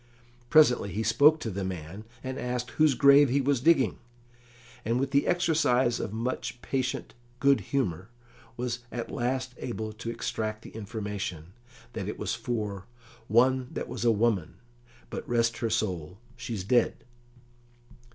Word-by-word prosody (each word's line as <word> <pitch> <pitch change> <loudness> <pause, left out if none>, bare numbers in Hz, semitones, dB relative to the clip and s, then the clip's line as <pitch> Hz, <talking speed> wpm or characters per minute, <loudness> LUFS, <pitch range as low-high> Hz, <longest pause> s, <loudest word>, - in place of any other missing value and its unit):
Presently 125 -9 +5
he 110 - -2
spoke 145 +8 +5
to 110 - -3
the 100 +1 -3
man, 95 +3 -6 0.2
and 130 0 -4
asked 125 -1 -3
whose 155 -3 +3
grave 140 +2 +7
he 135 +3 +2
was 135 -2 +1
digging, 140 -5 +3 0.8
and 115 +3 0
with 135 +1 -1
the 140 +1 +2
exercise 150 -9 +2
of - - -3
much 120 +2 -3
patient 130 -2 -2 0.3
good 140 0 +4
humour 100 - -1 0.5
was 120 0 -2
at 120 -1 -5
last 130 +1 -2
able 110 -3 -4
to 115 +1 -6
extract 110 -1 -3
the - - -11
information 100 -6 -5 0.4
that 100 - -4
it 105 - -4
was - - -2
for 110 -5 -3 0.4
"one 130 +3 +3
that - - -4
was 120 -1 -5
a 120 - +4
woman, 105 -6 +1 0.6
but, - - -6
rest 115 -1 +1
her 115 - 0
soul, 90 -5 -2 0.2
she's 115 -5 -5
dead." 120 +5 +2
120 Hz, 150 wpm, -28 LUFS, 105-130 Hz, 0.8 s, grave